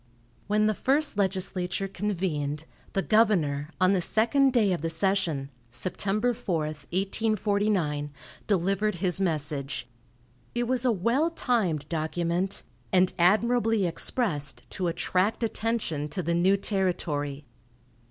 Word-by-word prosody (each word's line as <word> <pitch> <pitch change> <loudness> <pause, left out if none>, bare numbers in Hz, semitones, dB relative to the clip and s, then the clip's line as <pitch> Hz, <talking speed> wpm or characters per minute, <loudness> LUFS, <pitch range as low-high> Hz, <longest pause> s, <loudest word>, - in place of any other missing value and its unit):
When 210 +1 +2
the 215 - +3
first 285 +6 +1
legislature 190 -1 -1
convened, 165 -7 -2 0.3
the 195 - 0
governor, 165 -10 +2
on 185 +1 +4
the 185 - +2
second 250 +9 +3
day 215 -6 +3
of 175 - -3
the 165 - -1
session 165 -5 0 0.2
(Sept. 200 - -1
4, 185 -5 -2
1849), 195 0 -1 0.4
delivered 195 +1 +1
his 180 +1 0
message. 150 -7 -1 0.7
It 240 - +1
was 255 0 0
a 250 - +4
well 235 - +1
timed 200 - 0
document, 170 +4 -1 0.3
and 185 -1 +3
admirably 225 +3 +3
expressed 165 - 0
to 185 - -1
attract 185 +6 0
attention 215 -10 -2
to 180 +5 -2
the 170 - 0
new 185 +3 +3
territory. 150 -8 -1
190 Hz, 120 wpm, -27 LUFS, 165-215 Hz, 0.7 s, on